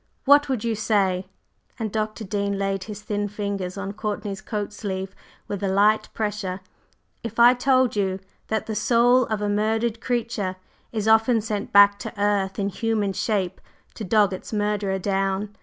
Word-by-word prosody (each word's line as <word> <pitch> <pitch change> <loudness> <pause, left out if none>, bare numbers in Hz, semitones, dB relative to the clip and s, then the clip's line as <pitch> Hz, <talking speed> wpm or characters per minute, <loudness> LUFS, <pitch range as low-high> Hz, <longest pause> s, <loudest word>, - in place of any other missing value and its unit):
What 285 +1 +6
would 255 -5 -1
you 230 -1 0
say," 195 -3 +1 0.5
and 220 -4 -3
Dr. 215 +1 -3
Dean 200 0 -2
laid 195 -1 -2
his 210 -1 -8
thin 205 -1 -2
fingers 200 -2 -4
on 195 0 -4
Courtney's 210 -1 -4
coat 210 -1 -4
sleeve 190 -2 -4 0.3
with 200 -1 -4
a 200 - 0
light 205 +3 +3
pressure, 205 -3 -3 0.6
"if 230 -1 -7
I 240 +1 +8
told 255 -1 +2
you 190 -2 0 0.3
that 220 -1 -1
the 220 - -4
soul 240 +3 +3
of 215 -1 -2
a - - 0
murdered 220 +2 0
creature 230 -6 -2 0.4
is 220 -2 -2
often 225 +2 +4
sent 210 -1 -4
back 200 0 +7
to 205 - -7
earth 200 -2 +1
in 200 -1 0
human 210 -1 -1
shape 195 -4 -1 0.3
to - - -7
dog 205 0 +3
its 185 - -7
murderer 205 -2 0
down? 195 +1 -1
210 Hz, 170 wpm, -24 LUFS, 195-220 Hz, 0.6 s, I